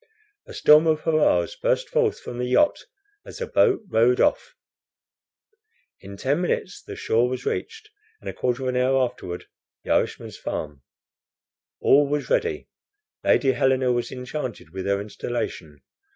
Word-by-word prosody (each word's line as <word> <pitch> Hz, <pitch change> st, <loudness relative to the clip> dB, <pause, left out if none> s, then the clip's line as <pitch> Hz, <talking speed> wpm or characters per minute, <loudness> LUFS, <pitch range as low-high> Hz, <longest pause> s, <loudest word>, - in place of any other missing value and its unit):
A 475 Hz, -, -10 dB
storm 155 Hz, +2 st, +6 dB
of 155 Hz, -1 st, +2 dB
hurrahs 160 Hz, -, +2 dB
burst -, -, 0 dB
forth 480 Hz, -4 st, +1 dB
from 120 Hz, -, -8 dB
the 125 Hz, -, -1 dB
yacht 295 Hz, -, +2 dB, 0.4 s
as -, -, -10 dB
the 480 Hz, -, -3 dB
boat 415 Hz, -, +2 dB
rowed 120 Hz, -2 st, +3 dB
off. -, -, +1 dB, 1.4 s
In 100 Hz, 0 st, -11 dB
ten 140 Hz, -, 0 dB
minutes 180 Hz, 0 st, -2 dB
the -, -, -9 dB
shore 120 Hz, +2 st, +1 dB
was 130 Hz, 0 st, -5 dB
reached, 440 Hz, -1 st, -4 dB, 0.3 s
and -, -, -13 dB
a -, -, -3 dB
quarter 125 Hz, +1 st, -2 dB
of 130 Hz, -, -1 dB
an 125 Hz, -, -1 dB
hour 130 Hz, +1 st, +2 dB
afterward 105 Hz, -9 st, -3 dB, 0.4 s
the -, -, -4 dB
Irishman's -, -, -1 dB
farm. 75 Hz, -2 st, -5 dB, 1.0 s
All 145 Hz, +1 st, +4 dB
was 145 Hz, 0 st, -2 dB
ready. 455 Hz, -5 st, 0 dB, 0.6 s
Lady 135 Hz, -, +3 dB
Helena 130 Hz, 0 st, +2 dB
was 120 Hz, -1 st, -1 dB
enchanted 125 Hz, -, -6 dB
with 95 Hz, +1 st, -5 dB
her 100 Hz, 0 st, +1 dB
installation. 100 Hz, -7 st, -5 dB
130 Hz, 150 wpm, -24 LUFS, 120-180 Hz, 1.4 s, storm